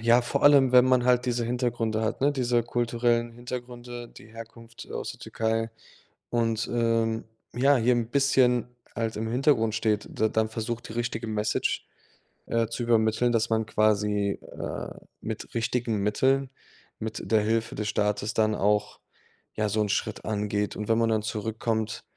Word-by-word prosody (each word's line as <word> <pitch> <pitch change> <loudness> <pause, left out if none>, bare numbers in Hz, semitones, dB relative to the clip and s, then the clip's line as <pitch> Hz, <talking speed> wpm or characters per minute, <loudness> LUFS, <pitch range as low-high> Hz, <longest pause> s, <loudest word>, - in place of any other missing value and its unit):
Ja, 120 +2 +4
vor 120 - -2
allem, 140 -3 +6
wenn 125 0 +8
man 130 -1 +3
halt 125 0 +3
diese 120 -1 0
Hintergründe 120 -2 -1
hat, 110 - -2
ne, 145 +2 +3
diese 120 -3 +1
kulturellen 120 0 0
Hintergründe, 120 0 -7
die 105 - -15
Herkunft, 115 +1 -11
äh, - - -11
aus - - -4
der - - -16
Türkei 115 0 -1 0.6
und, 115 -1 0
ähm, 115 -1 +1 0.3
ja, 135 +4 +4
hier 120 +1 +3
'n 120 -2 -1
bisschen 130 -3 +3 0.3
halt 115 -1 -2
im 110 +1 -3
Hintergrund 120 -3 +2
steht, 110 -2 0
d 110 - +3
dann 110 0 0
versucht, 115 +1 -4
die - - -7
richtige 115 -1 -3
Message, 105 -1 -1 0.6
äh, 115 -1 +1
zu 115 +2 -4
übermitteln, 115 +1 +2
dass 115 -1 +1
man 110 -1 +1
quasi, 105 -2 +1
äh, - - -6 0.3
mit - - -6
richtigen 115 -1 0
Mitteln, 130 +7 +1 0.5
mit 110 +1 -5
der 110 -1 +5
Hilfe 110 +3 0
des 105 - -3
Staates 105 +1 0
dann 110 -1 +2
auch, 105 +1 0 0.6
ja, 105 -1 0
so 110 +1 +1
'n 105 - 0
Schritt 105 +1 -2
angeht 105 -1 -1
und 105 - -5
wenn 115 - +4
man 115 -1 +2
dann 110 -1 +1
zurück 110 +1 -4
kommt, 110 -1 -1
115 Hz, 170 wpm, -27 LUFS, 110-120 Hz, 0.6 s, wenn